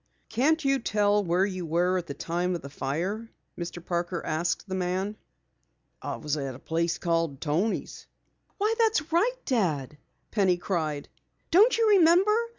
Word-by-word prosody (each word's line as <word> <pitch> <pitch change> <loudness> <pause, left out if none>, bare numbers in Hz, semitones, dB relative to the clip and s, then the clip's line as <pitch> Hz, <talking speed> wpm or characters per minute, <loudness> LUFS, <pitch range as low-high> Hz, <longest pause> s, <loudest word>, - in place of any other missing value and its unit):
"Can't 300 +7 +2
you 275 0 +3
tell 205 -2 +2
where 180 +1 +2
you 185 -3 -4
were 175 +3 +1
at 175 - -8
the 140 - -5
time 175 +2 -1
of 170 - -6
the 140 - -8
fire?" 180 +12 -3 0.3
Mr. 175 0 -6
Parker 175 0 -2
asked 165 +5 -1
the 190 - -5
man. 185 +3 -1 0.9
"I - - -4
was 150 0 -2
at 135 -3 -4
a - - -9
place 165 +4 -1
called 165 -5 -1
Toni's." 170 +9 -2 0.5
"Why, 425 +2 +1
that's 425 -9 +2
right, 435 +10 +2
Dad!" 150 - -1 0.3
Penny 190 -4 +2
cried. 155 -6 -2 0.4
"Don't 420 +9 +6
you 455 -1 +3
remember? 380 +2 +5
180 Hz, 155 wpm, -27 LUFS, 165-245 Hz, 0.9 s, Don't